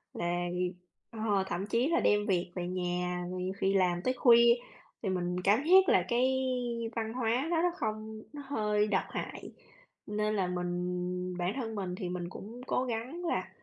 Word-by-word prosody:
là 175 +1 -1
vì 180 0 -1 0.4
ờ, 215 -4 0
thậm 190 +2 -3
chí 235 +6 +1
là 340 +1 +2
đem 205 +1 +3
việc 180 -3 0
về 175 -1 -3
nhà, 180 0 -2
rồi 185 0 -4
nhiều 185 +1 -2
khi 195 0 +1
làm 180 -2 +2
tới 255 - +2
khuya, 235 -1 +7 0.5
thì 200 - -1
mình 180 -1 -1
cảm 215 +9 +4
giác 375 +2 +7
là 180 - +4
cái 260 +2 +2 0.5
văn 225 0 -2
hóa 250 +4 0
nó 335 -1 +2
rất 350 -1 +1
không 220 -2 -4
nó 290 -1 -7
hơi 210 -5 +1
độc 195 -2 +1
hại. - - -6 0.5
Nên 210 +1 0
là 190 -3 +1
mình 180 0 -2
bản 180 +2 0
thân 225 -4 -3
mình 185 -3 -3
thì 180 -1 -4
mình 175 -1 -4
cũng 225 +7 -9
cố 255 - +1
gắng 255 +9 -4
là 340 - -1
205 Hz, 190 wpm, -31 LUFS, 180-235 Hz, 0.5 s, khuya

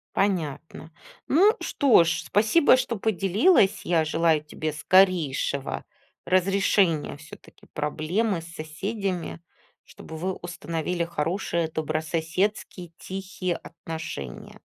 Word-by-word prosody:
Понятно. 160 -4 -2 0.4
Ну 385 +10 +5
что 260 - +4
ж, 170 +1 -1
спасибо, 225 +8 +4
что 255 -2 -2
поделилась. 205 - +3
Я 165 -2 +2
желаю 160 0 +2
тебе 155 +1 -4
скорейшего 155 -5 +2 0.4
разрешения 185 -4 +2
всё-таки 155 +1 -15
проблемы 165 +7 -1
с - - -11
соседями, 180 +2 -4 0.4
чтобы 160 - -12
вы 180 +4 -2
установили 170 0 -3
хорошие, 170 +1 -1
добрососедские, 160 +4 -2
тихие 185 -2 -4
отношения. 160 - -8
170 Hz, 95 wpm, -25 LUFS, 160-195 Hz, 0.4 s, Ну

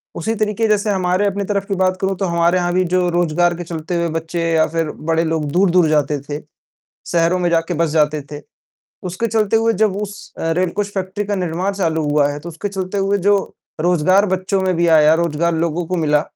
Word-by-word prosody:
उसी 220 +7 -2
तरीक़े 215 +1 0
जैसे 210 0 +1
हमारे 185 +1 +1
अपनी 200 0 -2
तरफ़ 200 -1 -1
की 195 - -1
बात 185 0 +1
करूँ 190 0 0
तो 195 - -1
हमारे 170 +1 +2
यहाँ 175 0 0
भी 185 0 +2
जो 180 -1 +2
रोजगार 175 0 +1
के 175 - -5
चलते 165 +1 -5
हुए 170 0 0
बच्चे 165 +1 -4
या 160 -1 +4
फ़िर 165 -2 -2 0.2
बड़े 165 0 +2
लोग 160 -1 -1
दूर-दूर 180 -2 +3
जाते 150 -1 +1
थे, 145 +1 -6 0.7
शहरों 170 +1 +2
में 175 -1 +1
जाके 165 +1 0
बस 165 0 +1
जाते 150 -1 +1
थे। 145 - -7 0.7
उसके 190 +7 -2
चलते 220 -1 +1
हुए 225 0 +2
जब 215 -3 +1
उस 205 0 -8
अ, 165 - -1
रेल 180 +1 +1
कोच 205 0 -2
फैक्ट्री 195 +2 -3
का 205 0 -1
निर्माण 180 +2 -2
चालू 160 -5 -1
हुआ 145 -1 +3
है, 145 - -6
तो 170 +3 -8
उसके 170 +5 -5
चलते 190 0 -4
हुए 200 +1 +1
जो 200 +2 +3 0.4
रोजगार 180 +4 +3
बच्चों 190 +1 -1
में 185 -2 0
भी 170 0 +2
आया, 155 -1 +6
रोजगार 170 0 0
लोगों 165 +1 -1
को 185 - -2
मिला। 150 -2 +2
175 Hz, 220 wpm, -18 LUFS, 165-195 Hz, 0.7 s, आया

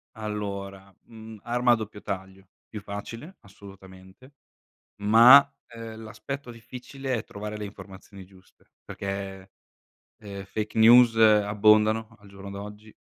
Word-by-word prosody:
Allora, 100 -3 -7
mhmm, 110 -1 -13
arma 120 +1 +1
a - - +5
doppio 110 -2 -8
taglio, 95 -1 -8 0.2
più 105 - -9
facile, 115 - -9
assolutamente, 95 +4 -16 0.7
ma 115 +6 +8 0.3
,ehm, 115 -1 -10
l'aspetto 115 +5 -8
difficile 125 +3 -7
è 110 - -5
trovare 105 +1 -8
le 105 - -6
informazioni 100 -1 -12
giuste, 95 0 -24
perché, 95 -1 -7 0.7
ehm, 100 -2 -9
fake 105 +2 -5
news 115 +1 +6
abbondano 110 +1 +3
al 100 -1 -18
giorno 100 0 -11
d'oggi 105 +2 -10
105 Hz, 120 wpm, -25 LUFS, 100-115 Hz, 0.7 s, ma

